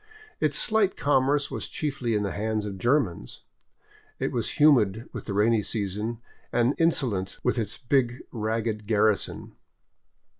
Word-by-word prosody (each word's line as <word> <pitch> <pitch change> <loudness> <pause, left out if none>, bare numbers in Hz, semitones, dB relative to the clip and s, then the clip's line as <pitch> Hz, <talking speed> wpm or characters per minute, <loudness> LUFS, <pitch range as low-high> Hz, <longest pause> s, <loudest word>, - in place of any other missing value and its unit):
Its - - +1
slight 215 -3 +2
commerce 145 0 +2
was - - -4
chiefly 135 -6 -2
in 105 - +1
the 100 - -2
hands 110 0 -2
of 100 -2 -6
Germans. 115 - 0 0.8
It - - -2
was - - -2
humid 120 -8 +4
with - - -6
the 100 - -4
rainy 110 +2 +3
season, 105 +2 -2 0.3
and 120 +3 +2
insolent 120 - +1
with 125 -1 +1
its 105 -2 -2
big 125 -2 0
ragged 110 -1 -2
garrison. 105 -1 +1
115 Hz, 140 wpm, -26 LUFS, 105-135 Hz, 0.8 s, humid